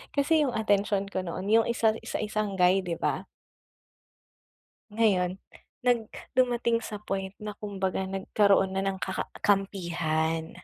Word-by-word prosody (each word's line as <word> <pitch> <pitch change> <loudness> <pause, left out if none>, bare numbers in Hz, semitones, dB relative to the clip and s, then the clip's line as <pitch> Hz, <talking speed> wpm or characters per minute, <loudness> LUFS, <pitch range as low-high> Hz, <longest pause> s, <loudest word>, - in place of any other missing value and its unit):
Kasi 300 +2 +3
yung 250 - -3
atensyon 205 -2 +1
ko 190 - -1
noon 180 +2 -4
yung 225 0 +5
isa 230 -2 +3 0.2
sa - - -2
isang 210 -1 -2
guy, 180 +1 +4
di 175 -3 -3
ba? - - -2 1.6
Ngayon, 195 -4 +2 0.5
nag 235 -3 +2 0.2
dumating 240 -2 +2
sa 215 -2 -6
point 195 -1 -4
na 210 0 -6
kumbaga 190 -2 -2
nagkaroon 195 0 +2
na 190 - 0
ng 195 0 -1
ka 190 0 -3
ka - - -3 0.2
kampihan. 170 -5 0
195 Hz, 140 wpm, -28 LUFS, 190-220 Hz, 1.6 s, yung